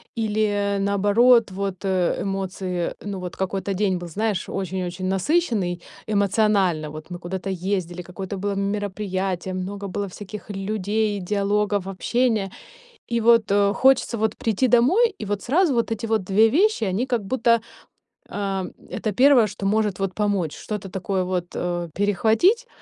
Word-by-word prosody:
или, 210 -2 0
наоборот, 205 +4 +4
вот, 195 0 -4
э, 185 -2 +1
эмоции. 190 -2 -3
Ну 200 -2 -5
вот 180 -1 -6
какой-то 195 +1 -2
день 190 -1 +1
был, 175 - -7
знаешь, 205 +2 -2
очень-очень 185 -1 -3
насыщенный 195 - 0 0.3
эмоционально. 200 -6 +2
Вот 155 +2 -9
мы 175 - -5
куда-то 185 +2 -5
ездили, 180 -1 -2
какое-то 185 +2 -6
было 200 +1 -2
мероприятие, 195 -2 -2
много 195 +2 -4
было 200 +1 -3
всяких 205 +3 -9
людей, 205 +1 -1
диалогов, 205 +1 0
общения. 210 +1 0 0.6
И 235 -1 0
вот, 230 -2 +4
э, 200 0 +3
хочется 265 -2 +3
вот 220 0 0
прийти 230 +3 +1
домой, 360 - +4
и - - -5
вот 205 0 -2
сразу 310 +3 +2
вот 235 -1 0
эти 225 0 -3
вот 220 -3 0
2 205 +4 +4
вещи, 370 - +2
они 200 +6 -1
как 240 -4 0
будто, 235 +1 +2 0.7
э, 195 -2 -2 0.3
это 215 - -2
1, 255 -1 +6
что 200 0 -6
может 210 -1 +1
вот 195 -1 -1
помочь, 200 -7 -1
что-то 210 -2 -5
такое 190 0 -2
вот, 180 -1 -2
э, 175 -1 -2
перехватить, 220 - +2
200 Hz, 150 wpm, -23 LUFS, 185-220 Hz, 0.7 s, 1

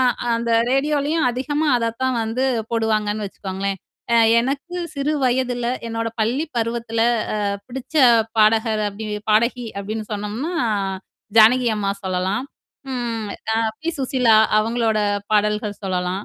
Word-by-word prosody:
அ - - +4 0.3
அந்த 235 0 -2 0.2
ரேடியோலயும் 290 +2 +1
அதிகமா 290 +5 -1
அதத்தான் 240 +3 -1
வந்து 225 +4 -1 0.3
போடுவாங்கன்னு 215 -2 0
வச்சுக்கோங்களேன். 195 0 -4 0.4
அ - - +5 0.2
எனக்கு 280 +8 -3 0.2
சிறு 285 +2 -1
வயதுல, 250 -1 0 0.2
என்னோட 230 0 -2
பள்ளி 255 +9 0
பருவத்தில, 230 0 -2 0.3
அ, - - -1 0.3
பிடிச்ச 260 +3 -9 0.4
பாடகர் 220 0 +3
அப்படின் 210 +1 -5 0.2
பாடகி 235 +2 +2
அப்படின்னு 215 +2 -5
சொன்னோம்னா, 215 - -3 0.8
ஜானகி 240 +3 +6
அம்மா 200 -1 0
சொல்லலாம். 185 +5 -1 0.5
ம். 230 -3 -3 0.3
அ, - - +1 0.2
பி. 325 - -4
சுசீலா 250 -4 +3 0.2
அவங்களோட 225 0 0 0.3
பாடல்கள் 210 0 0
சொல்லலாம். 185 +1 -2
230 Hz, 120 wpm, -21 LUFS, 210-255 Hz, 0.8 s, ஜானகி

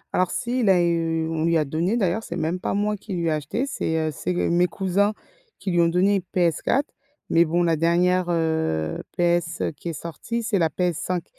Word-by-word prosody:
Alors 185 -1 +2
si 245 +1 -2
il 215 -5 +2
a 185 -2 +5
eu 165 -1 +1
on 160 -1 -2
lui 165 -1 +3
a 155 - +1
donné 170 +10 0
d'ailleurs, 195 0 +1
c'est 170 - -6
même 175 +2 -1
pas - - -2
moi 210 +1 0
qui 200 0 -8
lui 170 -1 -1
ai - - +2
acheté, 155 - -2
c'est, 160 -11 -2
heu - - -4
c'est 175 +6 -3
g - - +1
mes 175 +1 +3
cousins 200 +3 +1 0.4
qui 190 - -3
lui 175 0 +3
ont 170 - +4
donné 190 +4 +3 0.2
PS4, 175 - +2 0.5
mais 170 +1 +5
bon 175 +2 +1
la 165 -1 +2
dernière, 175 +2 +2
heu, 160 - 0 0.2
PS 175 -1 +1
qui 170 - -6
est - - -3
sortie 230 +8 -4
c'est 210 -4 0
la 165 -1 +3
PS5. 180 0 -2
175 Hz, 215 wpm, -24 LUFS, 165-190 Hz, 0.5 s, a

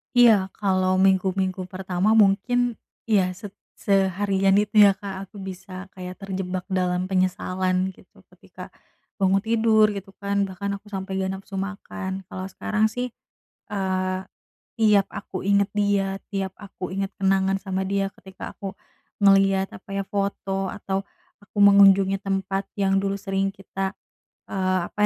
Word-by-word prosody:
Iya 225 -6 +6
kalau 185 -2 +1
minggu-minggu 190 -1 +1
pertama 190 +2 0
mungkin 225 +4 +3 0.2
ya 205 -5 +3
se 205 +1 -9 0.3
seharian 195 0 +2
itu 210 +1 +1
ya 200 - +7
Kak, 195 -2 -7
aku 205 - -14
bisa 190 0 -8
kayak 185 -1 -8
terjebak 190 -2 -4
dalam 180 -1 0
penyesalan 185 0 0
gitu. - - -21
Ketika - - -12 0.5
bangun 195 0 +3
tidur 220 -1 +4
gitu 200 0 -7
kan, 200 0 0
bahkan 200 +2 -4
aku 205 - -22
sampai 190 -1 -5
gak 190 0 -1
nafsu 195 0 -7
makan, 195 -1 -5
kalau 185 0 -5
sekarang 215 +2 0
sih, 245 +2 -4 0.6
eee, 185 -2 -1 0.6
tiap 210 -3 +4
aku 185 -2 -6
ingat 200 0 +3
dia, 200 -1 +1
tiap 195 -1 -3
aku 195 -3 -8
ingat 195 0 -2
kenangan 195 0 +2
sama 190 -1 -2
dia, 195 +1 0
ketika 190 -1 -9
aku 195 -1 -6 0.4
ngeliat 195 -1 +4
apa 190 - -15
ya, 200 - -1
foto 195 -1 -2
atau 195 -1 -3 0.4
aku 205 - -16
mengunjungi 195 -1 +7
tempat 195 0 -2
yang 195 -1 +2
dulu 195 0 -1
sering 195 0 -1
kita, 195 -1 -4 0.6
eee, 185 -1 +1
apa - - -58
195 Hz, 140 wpm, -24 LUFS, 190-200 Hz, 0.6 s, ya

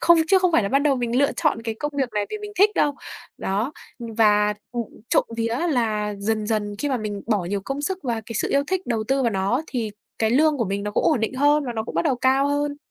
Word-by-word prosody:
không 340 -1 +6
chứ 385 - +6
không 365 -2 +2
phải 235 - +4
là 200 - -1
bắt 275 - +3
đầu 285 -3 +3
mình 240 0 0
lựa 280 - +3
chọn 310 -8 0
cái 225 -1 -3
công 295 0 -2
việc 265 -3 +1
này 205 -1 0
vì 430 - -4
mình 415 0 -8
thích 410 +2 +6
đâu. 290 -1 +2 0.4
Đó, 210 +9 -1 0.3
ưm, 230 -2 -7
và, 210 -1 +4 0.2
ừm, 240 -1 -1 0.3
trộm - - +3
vía 230 +1 -1
là 215 -5 0
dần 215 +1 -1
dần 210 -2 -1
khi 290 - -1
mà 265 - +1
mình 210 -3 -4
bỏ 210 -5 +1
nhiều 200 +3 -2
công 275 +1 -3
sức 375 +5 -2
và 240 -3 -1
cái 230 - -7
sự - - -1
yêu 280 - +3
thích 375 +1 -2
đầu 225 -3 -1
tư 270 0 +2
vào 235 - +2
nó, 200 +8 0
thì 230 -5 -3 0.3
cái 220 -1 +2
lương 295 +3 +3
của 230 - +1
mình 200 +1 -2
nó 210 - -3
cũng - - 0
ổn 230 - +3
định 225 +3 -1
hơn 290 +2 +3
và 245 - -2
nó 220 -1 -2
cũng 190 - -8
bắt 170 - +2
đầu 260 - +2
cao 265 +3 +3
hơn. 285 0 -1
240 Hz, 280 wpm, -23 LUFS, 215-285 Hz, 0.4 s, không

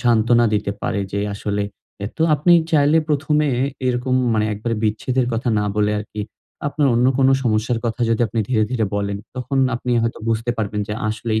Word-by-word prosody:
সান্ত্বনা 120 0 +3
দিতে 105 -1 0
পারে। 100 - -1
যে 100 - -1
আসলে 100 0 -2 0.4
এ - - -1
তো 160 - 0
আপনি 160 +4 +3 0.2
চাইলে 150 +1 +4
প্রথমে 150 +1 +1 0.4
এরকম 125 +1 0 0.2
মানে 110 0 +1
একবারে 115 +3 -2
বিচ্ছেদের 125 +4 0
কথা 115 +2 -1
না 105 - 0
বলে 105 0 +2
আরকি 105 0 -6 0.5
আপনার 145 -1 +1
অন্য 120 +2 +3
কোন 135 0 +4 0.2
সমস্যার 115 +1 +1
কথা 115 +2 -2
যদি 115 - +1
আপনি 110 +2 -2
ধীরে, 110 -4 +2
ধীরে 120 -4 0
বলেন, 100 0 -2 0.2
তখন 135 +2 -2 0.2
আপনি 125 +1 -3
হয়তো 115 - -2
বুঝতে 115 +1 0
পারবেন 105 -1 -2
যে 105 - -2 0.2
আসলেই 110 0 -1
115 Hz, 185 wpm, -20 LUFS, 110-130 Hz, 0.5 s, চাইলে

